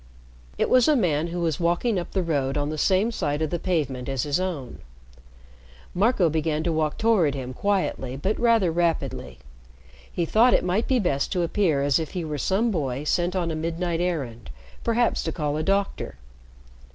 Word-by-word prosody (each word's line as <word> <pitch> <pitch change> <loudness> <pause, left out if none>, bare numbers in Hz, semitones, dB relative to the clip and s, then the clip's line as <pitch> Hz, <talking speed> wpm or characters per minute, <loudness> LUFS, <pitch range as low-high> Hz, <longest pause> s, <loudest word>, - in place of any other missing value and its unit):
It - - +1
was 255 -2 +4
a 305 - +5
man 165 - +1
who 175 +1 -4
was 160 -4 -1
walking 175 +5 +1
up 175 - -6
the 190 - -1
road 140 -4 -1
on 145 0 -1
the 155 - -4
same 195 +7 +2
side 145 -8 -1
of 155 - -2
the 175 - -1
pavement 140 -9 -2
as 135 -3 -1
his 145 +3 0
own. 170 -9 -4 1.1
Marco 200 -1 +3
began 155 0 -1
to 170 - 0
walk 155 -1 0
toward 195 -11 +2
him 130 -1 -5
quietly 180 -8 -1
but 190 +10 -1
rather 230 -7 +3
rapidly. 165 - -1 0.7
He 170 - -1
thought 230 +8 +4
it - - +1
might 185 +5 0
be 260 - +3
best 140 - 0
to 180 - +1
appear 165 -5 +1
as 140 +1 +3
if 160 - -5
he 180 -3 -3
were 150 -2 -4
some 210 - +1
boy 140 -6 -2
sent 175 +4 0
on 175 -3 0
a - - -2
midnight 165 +1 -2
errand 135 - -3 0.3
perhaps 235 +1 +1
to - - -2
call 150 -3 -2
a 155 - -1
doctor. 195 +3 -1
170 Hz, 190 wpm, -25 LUFS, 145-190 Hz, 1.1 s, a